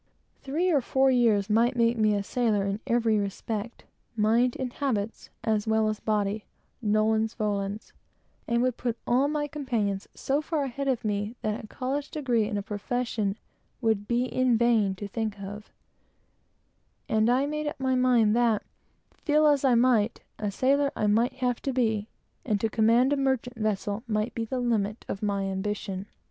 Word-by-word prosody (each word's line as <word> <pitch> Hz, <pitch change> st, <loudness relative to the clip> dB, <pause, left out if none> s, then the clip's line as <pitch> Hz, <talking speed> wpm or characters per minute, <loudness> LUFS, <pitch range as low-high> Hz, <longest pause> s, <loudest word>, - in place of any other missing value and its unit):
Three 330 Hz, +7 st, 0 dB
or 290 Hz, -4 st, +3 dB
four 265 Hz, +2 st, +2 dB
years 225 Hz, -5 st, +3 dB
would 230 Hz, +4 st, +3 dB
make 235 Hz, 0 st, +3 dB
me 215 Hz, -2 st, +2 dB
a 200 Hz, -, -1 dB
sailor 215 Hz, -3 st, 0 dB
in 200 Hz, +1 st, -2 dB
every 230 Hz, -3 st, +2 dB
respect, 210 Hz, +3 st, -4 dB, 0.3 s
mind 230 Hz, +3 st, +2 dB
and 255 Hz, -2 st, -3 dB
habits, 225 Hz, -6 st, -2 dB
as 215 Hz, -1 st, 0 dB
well 220 Hz, 0 st, +2 dB
as 215 Hz, -, -3 dB
body 210 Hz, -1 st, -1 dB, 0.4 s
nolens 220 Hz, 0 st, +1 dB
volens; 205 Hz, -1 st, -3 dB, 0.5 s
and 235 Hz, +1 st, +2 dB
would 255 Hz, -2 st, 0 dB
put 240 Hz, -2 st, -2 dB
all 255 Hz, +4 st, +3 dB
my 295 Hz, 0 st, -1 dB
companions 230 Hz, -10 st, -2 dB
so 280 Hz, +2 st, 0 dB
far 310 Hz, -1 st, -1 dB
ahead 275 Hz, +1 st, -4 dB
of 250 Hz, -4 st, 0 dB
me 205 Hz, +2 st, -2 dB
that 215 Hz, 0 st, -3 dB
college 275 Hz, +2 st, -3 dB
and 235 Hz, -7 st, 0 dB
a 200 Hz, -, -3 dB
profession 215 Hz, -1 st, -2 dB, 0.4 s
would 220 Hz, -4 st, 0 dB
be 240 Hz, +1 st, +1 dB
in 255 Hz, -2 st, +2 dB
vain 220 Hz, -5 st, +3 dB
to 205 Hz, +2 st, -6 dB
think 215 Hz, 0 st, -3 dB
of; 205 Hz, +2 st, -8 dB, 1.4 s
and 220 Hz, +1 st, +2 dB
I 255 Hz, +3 st, +3 dB
made 300 Hz, +1 st, -3 dB
up 295 Hz, -, -4 dB
my 260 Hz, -1 st, +1 dB
mind 245 Hz, -4 st, +4 dB
that, 235 Hz, -3 st, +2 dB, 0.6 s
feel 305 Hz, 0 st, +3 dB
as 290 Hz, -2 st, +4 dB
I 260 Hz, -3 st, +4 dB
might, 235 Hz, -2 st, +3 dB, 0.2 s
a 210 Hz, -, -1 dB
sailor 275 Hz, +7 st, +2 dB
I -, -, 0 dB
must 245 Hz, +4 st, +1 dB
be, 220 Hz, -4 st, +1 dB, 0.4 s
and 210 Hz, -4 st, 0 dB
to 225 Hz, -, 0 dB
be 225 Hz, -, -2 dB
master 250 Hz, +6 st, +4 dB
of 265 Hz, -2 st, +1 dB
a -, -, -7 dB
vessel, 205 Hz, 0 st, -1 dB
must 215 Hz, +1 st, -1 dB
be 230 Hz, -, -2 dB
the 250 Hz, +2 st, -3 dB
height 210 Hz, -2 st, -1 dB
of 195 Hz, -, -4 dB
my 200 Hz, -2 st, 0 dB
ambition. 195 Hz, 0 st, -3 dB
225 Hz, 170 wpm, -27 LUFS, 210-255 Hz, 1.4 s, mind